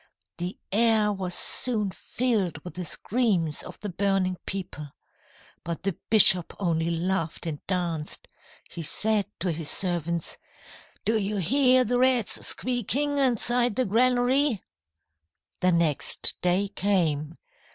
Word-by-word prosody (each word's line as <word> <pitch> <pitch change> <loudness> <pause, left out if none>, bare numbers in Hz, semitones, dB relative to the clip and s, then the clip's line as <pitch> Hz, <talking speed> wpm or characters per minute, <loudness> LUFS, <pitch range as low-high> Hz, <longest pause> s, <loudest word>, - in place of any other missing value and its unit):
"The 175 +2 -5
air 215 0 +2
was 185 -2 -4
soon 215 -6 +2
filled 215 -7 -2
with 180 - -9
the 180 0 -5
screams 190 - -1
of - - -11
the 205 - -4
burning 190 0 0
people. 180 -6 -5 0.8
But 170 +1 -5
the 195 -3 -2
bishop 190 -5 +5
only 165 -3 0
laughed 170 -1 -2
and 155 -3 -5
danced. 170 -5 -2 0.4
He 170 - -7
said 210 +6 +1
to 180 0 0
his 160 -1 -1
servants: 170 -2 -1 0.7
"'Do 220 0 +2
you 205 +1 -2
hear 255 - +4
the 245 +1 0
rats 255 -4 +2
squeaking 270 +4 0
inside 245 -2 +2
the 255 - +1
granary?' 245 +2 +2 1.0
"The 185 - +2
next 170 -4 +1
day 185 +3 +1
came. 170 -7 -1
195 Hz, 125 wpm, -26 LUFS, 170-235 Hz, 1.0 s, bishop